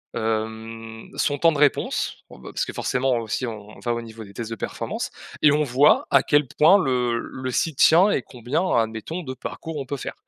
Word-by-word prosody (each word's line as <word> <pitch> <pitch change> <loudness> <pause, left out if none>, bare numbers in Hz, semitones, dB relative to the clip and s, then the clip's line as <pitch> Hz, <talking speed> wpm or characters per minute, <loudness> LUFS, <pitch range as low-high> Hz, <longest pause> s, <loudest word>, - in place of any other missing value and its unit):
hem, 110 0 -4
son 145 -1 0
temps 165 - +5
de 150 - -3
réponse. 145 -1 +1
Bon, - - -13
ben, 65 - -10
parce - - -1
que - - -7
forcément, 130 0 0
heu, 115 - -2
aussi 115 +3 -3
on 115 - -4 0.2
on - - -14
va 120 -1 -1
au 120 - -3
niveau 115 -1 -10
des 100 -1 -13
tests 115 +2 -5
de 115 - -2
performance - - -4 0.3
et 150 - +6
on 150 +1 +2
voit 140 +2 +4
à - - +6
quel 145 -2 +2
point 165 +6 +7
le 125 -8 +1
le 130 +1 -5
site 155 +3 -1
tient 180 +6 +6
et 135 - +1
combien, 125 +8 -3 0.2
admettons, 115 +10 -2
de 130 -2 -5
parcours, 160 +5 -7
on 140 - -4
peut 140 +1 -4
faire. - - -6
125 Hz, 230 wpm, -23 LUFS, 115-145 Hz, 0.3 s, point